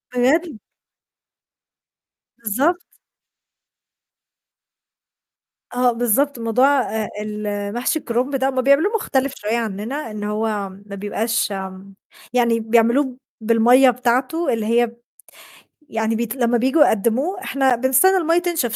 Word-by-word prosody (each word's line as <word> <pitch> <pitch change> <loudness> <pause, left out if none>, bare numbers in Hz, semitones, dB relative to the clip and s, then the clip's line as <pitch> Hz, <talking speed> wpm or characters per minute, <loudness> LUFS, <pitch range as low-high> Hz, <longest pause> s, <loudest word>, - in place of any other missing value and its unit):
بجد؟! 280 +2 +1 1.8
بالضبط. 270 - -1 2.8
آه 250 0 +1
بالضبط، 245 +3 0
موضوع 230 +3 +2
آآ 220 -2 -3
ال 210 -1 -4
محشي 250 +7 -1
الكرُنب 255 +3 -2
ده، 265 0 +1
هُم 260 -1 -1
بيعملوه 280 - +3
مختلف 275 -9 -1
شوية 215 +3 -2
عنّنا 225 +4 -4
إن 210 -1 -6
هو 210 +2 -2 0.4
ما 200 - -8
بيبقاش 210 +2 -2
آمم 190 0 -7 0.4
يعني 235 -2 +2
بيعملوه 235 +4 +1 0.2
بالمَيّة 235 +4 +5
بتاعته 255 +7 0
اللي 225 -2 -2
هي 235 +2 +2
ب 235 +1 -15 0.9
يعني 225 0 -1
بيت 235 +1 -3
لمّا 240 -2 +1
بييجوا 265 +6 +3
يقدّموه 255 - 0
إحنا 265 -2 +1
بنستنى 260 +11 +3
المَيّة 335 -1 +2
تنشف 330 -10 -2
240 Hz, 115 wpm, -20 LUFS, 220-270 Hz, 2.8 s, بالمَيّة